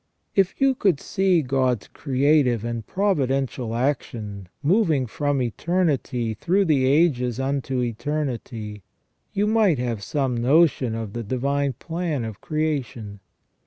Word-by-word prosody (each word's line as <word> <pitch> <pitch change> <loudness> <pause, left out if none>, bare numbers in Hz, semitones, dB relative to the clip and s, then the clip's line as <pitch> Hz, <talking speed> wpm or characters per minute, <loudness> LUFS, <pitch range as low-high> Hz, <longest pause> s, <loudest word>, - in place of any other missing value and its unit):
If 195 -2 +1
you 270 0 +4
could 195 - +1
see 185 -4 +1
God's 130 -3 0
creative 135 -4 +2
and 115 -2 -4
providential 135 - 0
action, 110 -7 -3
moving 160 - +3
from 140 +2 -1
eternity 130 - 0
through 185 - +1
the 140 -6 +3
ages 130 -5 +2
unto 135 -1 -1
eternity, 120 -4 -3 0.5
you 205 - +1
might 210 -7 +3
have 120 -4 -2
some 130 +4 -1
notion 130 -1 +3
of 110 -3 -5
the 120 - -3
divine 135 +4 -1
plan 165 -2 -3
of 110 -3 -7
creation. 140 - -3
135 Hz, 125 wpm, -24 LUFS, 120-155 Hz, 0.5 s, you